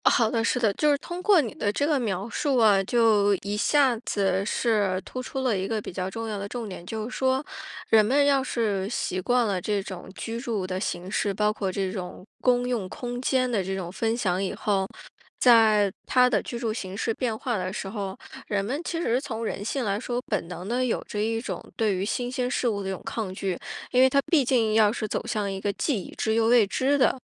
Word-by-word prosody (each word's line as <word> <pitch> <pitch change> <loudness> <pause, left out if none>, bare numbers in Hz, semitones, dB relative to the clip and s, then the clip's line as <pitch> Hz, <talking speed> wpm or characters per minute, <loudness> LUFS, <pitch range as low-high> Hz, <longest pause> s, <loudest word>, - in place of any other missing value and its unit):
好 225 -2 +4
的， 225 -1 +1
是 250 - +1
的， 220 -4 +2
就 300 +8 +2
是 285 - +3
通 350 +5 -7
过 395 -1 +5
你 230 -7 -5
的 205 - -1
这 280 +8 0
个 295 -2 +2
描 200 -4 -2
述 275 +3 0
啊， 210 -4 +5
就 210 -3 +4
一 200 +1 -2
下 265 +4 +3
子 195 -4 0
是 205 -4 +1
突 255 - -5
出 265 +1 -4
了 250 -5 +1
一 190 0 -2
个 220 0 -1
比 205 - -7
较 185 0 -3
重 225 +3 -5
要 210 -2 -3
的 200 - -4
重 235 +1 -5
点， 185 -3 -8
就 220 +1 -4
是 250 - -7
说 265 +2 +1 0.4
人 220 -1 +6
们 275 +7 +3
要 275 -2 +3
是 205 -6 -1
习 185 -5 -2
惯 245 +4 +2
了 195 -4 -1
这 205 +1 0
种 185 -1 -8
居 230 0 -4
住 225 -7 -2
的 185 0 -3
形 180 -2 -3
式， 205 0 0
包 210 +2 +1
括 195 -3 -2
这 190 0 -2
种 185 -2 -7 0.2
公 245 -1 +2
用 225 -7 -2
空 245 +3 -5
间 255 -1 +1
的 215 -5 0
这 190 +1 -3
种 180 -2 -5
分 225 +4 -1
享 190 -4 0
以 190 - -2
后， 195 -2 0 0.5
在 220 -4 +5 0.2
他 250 -1 +5
的 250 - +2
居 240 - -6
住 230 -2 -2
形 190 -3 -6
式 225 +1 0
变 230 -2 -2
化 240 +1 -2
的 185 0 -3
时 195 - -5
候， 195 -2 -5 0.3
人 200 -2 0
们 275 +9 -2
其 335 -1 -3
实 250 -6 +1
从 230 -5 -4
人 205 - -3
性 250 +4 -2
来 200 0 0
说， 245 +1 -2
本 - - -1
能 180 +1 -7
的 245 +3 0
有 250 - 0
着 210 - -4
一 225 +1 0
种 235 - -5
对 215 -3 +1
于 185 - -2
新 245 +4 -2
鲜 250 -1 -1
事 255 - 0
物 205 -3 0
的 190 - -4
这 190 - -2
种 - - -12
抗 215 -5 -3
拒。 190 -2 -2 0.4
因 250 - +4
为 260 - +7
他 275 - +3
毕 310 -5 +5
竟 235 -4 +2
要 215 -1 +5
是 220 -1 -3
走 - - -3
向 210 -2 -1
一 190 0 -5
个 205 - 0
既 225 0 -1
已 - - -10
知 220 - 0
又 225 0 +3
未 235 -2 +6
知 265 +8 +1
的 260 0 +2
220 Hz, 265 characters per minute, -26 LUFS, 195-245 Hz, 0.5 s, 为